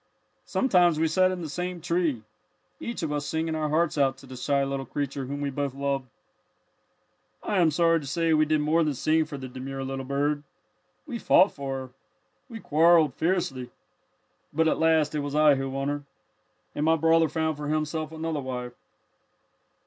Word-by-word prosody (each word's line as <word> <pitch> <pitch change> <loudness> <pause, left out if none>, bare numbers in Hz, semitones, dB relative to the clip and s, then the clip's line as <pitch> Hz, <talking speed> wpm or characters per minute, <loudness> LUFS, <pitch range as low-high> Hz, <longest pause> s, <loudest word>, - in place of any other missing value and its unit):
"Sometimes 180 - +3
we 160 - +3
sat 185 +3 +3
in 185 -2 -4
the - - -4
same 180 +4 -4
tree, 165 -8 -1 0.6
each 235 -6 -5
of 155 - -2
us 145 -1 -1
singing 160 +2 -2
our 155 -1 -1
hearts 155 0 +1
out 135 -2 +2
to 135 - -14
the 130 0 -10
shy 140 +2 0
little 135 0 -2
creature 140 -1 -3
whom 140 +1 -4
we 140 -1 -2
both 140 -1 -3
loved. 140 -1 -2 1.4
"I 205 - 0
am 170 -2 +5
sorry 165 +1 +3
to 145 - -9
say 165 +4 +1
we 155 0 +4
did 155 0 +2
more 160 +3 +2
than 150 -3 -1
sing 155 +4 +2
for 150 -2 -7
the 130 -1 -7
demure 135 +1 -6
little 135 0 -4
bird. 145 +2 -1 0.6
We 245 -6 -5
fought 195 - +5
for 135 -1 -4
her. 130 -1 -7 0.6
We 230 -2 -7
quarrelled 160 - +4
fiercely. 155 -8 -1 0.8
But 160 +2 +2
at - - +1
last 160 -2 +3
it 150 - -1
was 145 0 -4
I 150 -1 +6
who 135 0 -2
won 135 +1 -3
her, 145 0 -2 0.7
and 145 - -2
my 160 +1 +4
brother 165 0 +3
found 160 +1 -1
for 150 0 -6
himself 155 +1 -2
another 160 -2 -3
wife." 125 -2 -5
150 Hz, 185 wpm, -26 LUFS, 140-165 Hz, 1.4 s, I